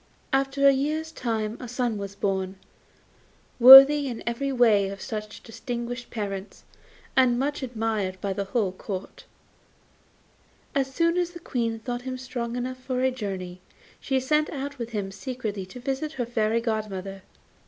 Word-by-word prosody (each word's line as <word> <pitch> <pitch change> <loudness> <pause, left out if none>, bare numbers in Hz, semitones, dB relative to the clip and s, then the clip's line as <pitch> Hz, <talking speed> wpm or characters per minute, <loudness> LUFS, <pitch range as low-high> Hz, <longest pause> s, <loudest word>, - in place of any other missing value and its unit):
After 275 +1 +3
a - - +8
year's 310 +4 -2
time 225 -5 -3
a 250 - -7
son 245 -3 -2
was 200 0 -6
born, 190 -1 -2 1.0
worthy 270 +3 +10
in 240 -3 -5
every 235 +4 -2
way 220 -6 +4
of 195 0 -7
such 215 0 -6
distinguished 240 +1 -6
parents, 200 -3 -6 0.5
and 255 -2 +4
much 290 +3 -2
admired 220 -6 -2
by 195 0 -2
the 200 +1 -3
whole 200 -2 0
Court. 190 0 -7 1.5
As 270 -2 0
soon 335 +4 +1
as 350 -1 -1
the 345 - -9
Queen 230 -8 -2
thought 245 +2 -5
him 255 0 -5
strong 245 -2 -5
enough 255 +1 -4
for 255 -1 -2
a 260 0 +2
journey 190 -6 -6 0.4
she 265 -1 0
set 300 +4 +1
out 280 -1 -6
with 235 -1 -4
him 205 -4 -4
secretly 205 -1 -5
to 250 - -10
visit 275 +5 -3
her 245 - -2
Fairy 230 -1 0
godmother. 200 -4 -4
240 Hz, 155 wpm, -26 LUFS, 210-265 Hz, 1.5 s, worthy